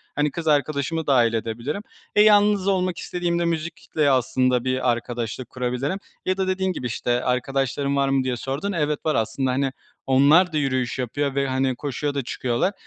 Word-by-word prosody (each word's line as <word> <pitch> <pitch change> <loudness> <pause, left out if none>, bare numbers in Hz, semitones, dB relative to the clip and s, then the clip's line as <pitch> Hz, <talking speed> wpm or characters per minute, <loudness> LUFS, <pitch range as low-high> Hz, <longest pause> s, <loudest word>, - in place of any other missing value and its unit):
Hani, 145 0 +1
kız 165 +1 -5
arkadaşımı 150 +1 0
dahil 120 -5 +4
edebilirim. 115 - -3 0.3
E, 210 - +6
yalnız 205 -2 +5
olmak 185 -2 +1
istediğimde 175 -1 -1
müzikle 160 -2 -1
aslında 130 -1 +2
bir 130 -1 +1
arkadaşlık 120 +1 -4
kurabilirim 130 +8 -2 0.3
ya 185 +1 0
da 190 - 0
dediğin 185 0 0
gibi 125 -7 -4
işte, 120 +1 -1
“arkadaşların 135 +2 0
var 140 0 +2
mı?“ 135 -1 +2
diye 125 -2 -1
sordun, 140 - -3
evet, 150 -4 0
var 155 - +1
aslında. 130 +4 0
Hani, 135 +1 0 0.4
onlar 150 +7 +5
da - - +1
yürüyüş 130 -3 -1
yapıyor 140 +3 -2
ve, 140 0 +1
hani, 130 0 0
koşuya 145 +2 -3
da 140 - -1
çıkıyorlar. 125 +9 -1
140 Hz, 175 wpm, -23 LUFS, 125-165 Hz, 0.4 s, E